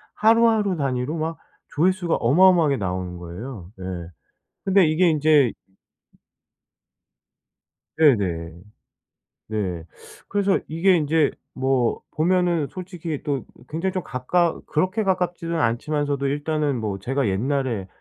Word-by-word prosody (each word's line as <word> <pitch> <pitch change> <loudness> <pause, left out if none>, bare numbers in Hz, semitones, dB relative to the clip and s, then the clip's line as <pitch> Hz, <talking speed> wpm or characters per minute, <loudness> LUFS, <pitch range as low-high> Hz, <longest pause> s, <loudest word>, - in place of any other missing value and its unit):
하루하루 220 -4 +3
단위로 135 +1 -1
막 160 +1 -3 0.4
조회수가 180 +2 +2
어마어마하게 160 +2 +4
나오는 90 -2 -3
거예요. 90 +3 -8
예. - - -7 0.8
근데 195 -2 +5
이게 165 +3 +3
인제 150 -5 +4 2.4
네네. 95 - +2 1.0
네. 95 -6 -3 0.4
그래서 200 -1 +1
이게 175 +4 +3
인제 155 0 +2 0.2
뭐 130 -2 0
보면은 175 -1 +1
솔직히 175 -4 -6
또 140 -3 -2 0.2
굉장히 170 +5 -2
좀 185 -2 -2
가까 165 +7 0
그렇게 185 +8 0
가깝지는 180 -3 -1
않지만서도 140 +3 0
일단은 145 -1 -1
뭐 105 -3 -3
제가 135 +4 -1
옛날에 120 0 -1
150 Hz, 255 characters per minute, -23 LUFS, 125-175 Hz, 2.4 s, 근데